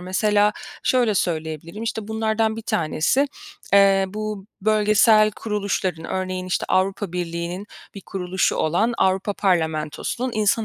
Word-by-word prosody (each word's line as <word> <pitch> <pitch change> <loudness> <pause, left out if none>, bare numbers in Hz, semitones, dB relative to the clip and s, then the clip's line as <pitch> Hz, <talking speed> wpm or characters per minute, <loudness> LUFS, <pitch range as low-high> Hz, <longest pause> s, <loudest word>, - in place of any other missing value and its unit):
Mesela 205 +3 +2 0.3
şöyle 245 -4 +2
söyleyebilirim: 165 +2 -3
İşte, 220 -2 -4
bunlardan 220 0 0
bir 225 - -6
tanesi, 170 - +1 0.5
eee, 195 -1 +5
bu 210 0 -5 0.2
bölgesel 215 0 +4
kuruluşların 200 -6 -2
örneğin, 185 0 -3
işte, 180 - -1
Avrupa 190 0 0
Birliği'nin 175 +2 -4 0.3
bir 200 - -8
kuruluşu 185 -1 -1
olan 210 +10 +1
Avrupa 190 +2 +1
Parlamentosu'nun 170 +6 -1
insan 215 +1 +2
195 Hz, 120 wpm, -22 LUFS, 180-215 Hz, 0.5 s, eee